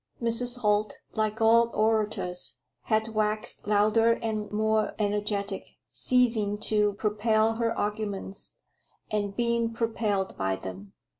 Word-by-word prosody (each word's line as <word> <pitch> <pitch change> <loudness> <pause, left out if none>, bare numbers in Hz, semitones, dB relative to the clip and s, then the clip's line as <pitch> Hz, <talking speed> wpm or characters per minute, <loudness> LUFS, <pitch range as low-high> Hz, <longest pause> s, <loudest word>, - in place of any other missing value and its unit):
Mrs. 240 +1 +2
Holt, 210 -1 +1 0.2
like 215 +1 -1
all 230 +1 +5
orators, 215 -5 0 0.3
had 220 +1 +1
waxed 215 0 -1
louder 215 +2 +4
and 220 -2 -3
more 215 0 +1
energetic, 205 -1 -2 0.2
ceasing 225 -5 +1
to 210 -2 +1
propel 215 +2 +1
her 230 -1 0
arguments, 205 -2 -4 0.6
and 205 -2 -1
being 235 -1 0
propelled 220 -4 -1
by 95 0 -1
them. 95 +1 -9
215 Hz, 115 wpm, -27 LUFS, 205-225 Hz, 0.6 s, all